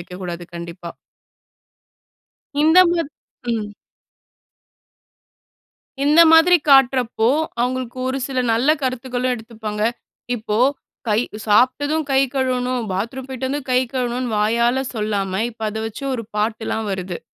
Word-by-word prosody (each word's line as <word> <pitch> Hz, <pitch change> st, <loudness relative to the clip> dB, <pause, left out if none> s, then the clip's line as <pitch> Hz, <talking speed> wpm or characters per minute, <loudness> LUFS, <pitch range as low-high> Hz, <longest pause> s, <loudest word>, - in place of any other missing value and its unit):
வைக்கக்கூடாது. 175 Hz, -1 st, -7 dB
கண்டிப்பா. 170 Hz, 0 st, -7 dB, 1.7 s
இந்த 320 Hz, +3 st, +5 dB
மாத் 335 Hz, -4 st, -1 dB, 0.4 s
ம். 215 Hz, -2 st, -2 dB, 2.4 s
இந்த 305 Hz, +3 st, +6 dB
மாதிரி 330 Hz, +2 st, +7 dB
காட்றப்போ, 255 Hz, -4 st, +4 dB, 0.3 s
அவுங்களுக்கு 255 Hz, 0 st, -2 dB
ஒரு 260 Hz, +1 st, -1 dB
சில 260 Hz, -2 st, -1 dB
நல்ல 260 Hz, +7 st, +3 dB
கருத்துகளும் 255 Hz, 0 st, -1 dB
எடுத்துப்பாங்க. 220 Hz, -2 st, -5 dB, 0.5 s
இப்போ 215 Hz, -1 st, -2 dB, 0.5 s
கை 210 Hz, -, +3 dB, 0.3 s
சாப்ட்டதும் 285 Hz, +8 st, +2 dB
கை 265 Hz, -, +4 dB
கழுவணும், 255 Hz, -2 st, 0 dB
பாத்ரூம் 230 Hz, +8 st, -4 dB
போய்ட்டு 260 Hz, -1 st, -4 dB
வந்து 290 Hz, +1 st, -2 dB
கை 250 Hz, -, +4 dB
கழுவணுன்னு, 245 Hz, -1 st, -2 dB
வாயால 235 Hz, +5 st, +2 dB
சொல்லாம, 205 Hz, -3 st, -2 dB, 0.2 s
இப்போ 225 Hz, -1 st, -9 dB
அத 220 Hz, +1 st, -5 dB
வச்சு 225 Hz, +5 st, -9 dB
ஒரு 230 Hz, -3 st, -3 dB
பாட்டுலாம் 220 Hz, 0 st, -2 dB
வருது. 185 Hz, -2 st, -4 dB
245 Hz, 110 wpm, -20 LUFS, 215-260 Hz, 2.4 s, மாதிரி